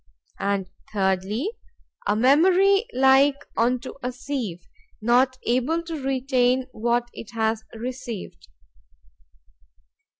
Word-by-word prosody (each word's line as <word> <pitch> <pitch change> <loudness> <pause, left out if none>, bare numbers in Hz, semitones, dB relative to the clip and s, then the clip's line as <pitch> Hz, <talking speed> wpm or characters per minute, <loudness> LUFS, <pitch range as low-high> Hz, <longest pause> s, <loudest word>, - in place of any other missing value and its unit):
And 200 -1 -1 0.2
thirdly, 200 - 0 0.6
a 205 - +2
memory 370 - +4
like 270 0 +5 0.2
unto 250 +2 0
a 250 0 -2
sieve, 245 -9 -5 0.3
not 250 +3 +3
able 255 +8 0
to 330 -3 -5
retain 260 -1 +1
what 240 +1 -1
it 230 - -10
has 220 0 0
received. 240 - -7
250 Hz, 95 wpm, -24 LUFS, 220-270 Hz, 0.6 s, like